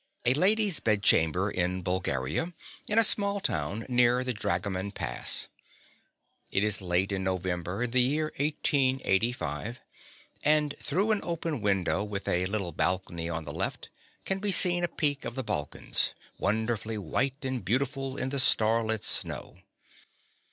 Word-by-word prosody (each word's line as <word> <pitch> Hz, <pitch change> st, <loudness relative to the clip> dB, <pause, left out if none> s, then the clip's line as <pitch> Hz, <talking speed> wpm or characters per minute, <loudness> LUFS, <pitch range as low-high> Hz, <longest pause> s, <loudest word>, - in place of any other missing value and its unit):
A 120 Hz, -, +4 dB
lady's 195 Hz, +3 st, +4 dB
bedchamber 100 Hz, -3 st, +2 dB
in 90 Hz, 0 st, -2 dB
Bulgaria, 90 Hz, -, -2 dB, 0.3 s
in 210 Hz, -, 0 dB
a 225 Hz, -, +8 dB
small 200 Hz, -1 st, +4 dB
town 90 Hz, -, -2 dB
near 125 Hz, 0 st, +3 dB
the 130 Hz, -1 st, -1 dB
Dragoman 100 Hz, -3 st, -2 dB
Pass. 60 Hz, -8 st, +1 dB, 1.0 s
It 95 Hz, -, +1 dB
is 105 Hz, -1 st, 0 dB
late 90 Hz, +2 st, 0 dB
in 95 Hz, -1 st, -2 dB
November 95 Hz, +2 st, -2 dB
in 125 Hz, -, -3 dB
the 125 Hz, +1 st, +3 dB
year 150 Hz, +5 st, 0 dB
1885, 125 Hz, -, 0 dB, 0.6 s
and 150 Hz, -1 st, +3 dB
through 205 Hz, +4 st, 0 dB
an 215 Hz, -, +2 dB
open 165 Hz, -6 st, -3 dB
window 95 Hz, -1 st, 0 dB
with 105 Hz, -1 st, -5 dB
a 90 Hz, +1 st, +1 dB
little 100 Hz, -3 st, -3 dB
balcony 85 Hz, 0 st, -2 dB
on 80 Hz, -1 st, -3 dB
the 75 Hz, -2 st, -7 dB
left -, -, -4 dB, 0.3 s
can 190 Hz, 0 st, -2 dB
be 205 Hz, 0 st, +1 dB
seen 175 Hz, -1 st, +5 dB
a -, -, +2 dB
peak 145 Hz, -4 st, +1 dB
of -, -, -6 dB
the 130 Hz, -, -3 dB
Balkans, 75 Hz, -, -2 dB, 0.2 s
wonderfully 110 Hz, +1 st, -1 dB
white 135 Hz, -, -2 dB
and 130 Hz, -4 st, -3 dB
beautiful 135 Hz, -, -1 dB
in 130 Hz, -, -1 dB
the 140 Hz, 0 st, -2 dB
starlit 110 Hz, -3 st, +3 dB
snow. -, -, 0 dB
115 Hz, 145 wpm, -28 LUFS, 95-140 Hz, 1.0 s, a